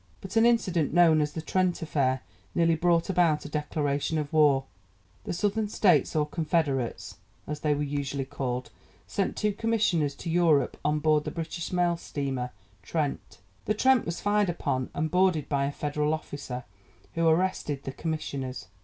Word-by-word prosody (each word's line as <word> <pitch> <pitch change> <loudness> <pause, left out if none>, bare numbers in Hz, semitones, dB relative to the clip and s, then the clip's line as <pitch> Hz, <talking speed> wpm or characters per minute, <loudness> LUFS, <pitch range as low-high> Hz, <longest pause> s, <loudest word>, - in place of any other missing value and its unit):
But 190 +2 -9
an 225 +1 +6
incident, 180 -10 +1
known 165 -3 +6
as 150 0 -1
'The 160 - -5
Trent 185 0 +1
Affair,' 135 -5 0 0.3
nearly 165 -1 +4
brought 170 +1 +2
about 175 -6 +2
a - - -6
declaration 150 0 -1
of 150 -1 -3
war. 145 -4 +4 0.6
The - - -3
Southern 205 +4 0
States, 175 -11 +3
or 150 -1 +3
'Confederates,' 150 -6 -1 0.3
as 150 0 -4
they 150 -1 +1
were 145 - -1
usually 140 -1 -2
called, 130 -2 -4 0.3
sent 195 - -2
two 210 -1 +1
commissioners 190 -11 +1
to 165 - -6
Europe 165 -4 +3
on 150 +1 +2
board 150 0 +2
the - - -3
British 165 0 -5
mail 175 -1 +2
steamer 135 -6 -3 0.3
Trent. 145 - -3 0.3
The 215 - +1
Trent 260 +2 +3
was 170 - -3
fired 205 -1 +2
upon 130 -6 -2
and 155 +1 -1
boarded 180 -5 +2
by 140 -1 +1
a 140 - -1
Federal 150 +1 -1
officer, 135 -5 -7 0.5
who 165 0 +1
arrested 160 -4 +1
the 135 - -4
commissioners. 135 - -4
155 Hz, 165 wpm, -28 LUFS, 145-175 Hz, 0.6 s, an